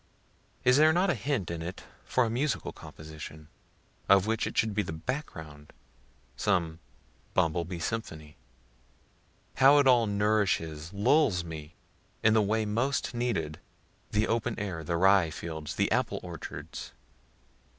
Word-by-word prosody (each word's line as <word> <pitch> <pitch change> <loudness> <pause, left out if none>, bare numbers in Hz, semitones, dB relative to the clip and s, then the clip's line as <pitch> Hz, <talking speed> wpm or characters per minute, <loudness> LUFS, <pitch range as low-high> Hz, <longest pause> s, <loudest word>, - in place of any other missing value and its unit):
(Is 125 +1 +5
there 155 +1 +6
not 180 +3 +2
a - - +2
hint 120 - -2
in 85 -1 -4
it 90 +3 -6 0.2
for 125 - +2
a - - -1
musical 130 +3 -1
composition, 75 0 -10 0.6
of 100 -1 +6
which 110 0 0
it - - -6
should 110 -2 +2
be 105 - +1
the 100 - -5
back 130 - -3
ground? 75 -2 -12 0.6
some 85 -6 0 0.6
bumble 85 -1 +2
bee 90 +1 -6
symphony?) 80 -5 -5 1.2
How 140 +2 +7
it 145 - +5
all 120 -4 +5
nourishes, 100 -7 0
lulls 110 - +3
me, 80 0 -8 0.5
in 110 - +5
the 110 - +5
way 110 +2 +1
most 120 +6 -1
needed; 105 -11 -2 0.5
the 105 +1 +1
open 115 0 -1
air, 90 -5 -4
the 85 +2 -1
rye 95 -1 +5
fields, 80 -1 -6
the - - +1
apple - - 0
orchards. - - -8
100 Hz, 145 wpm, -29 LUFS, 80-120 Hz, 1.2 s, How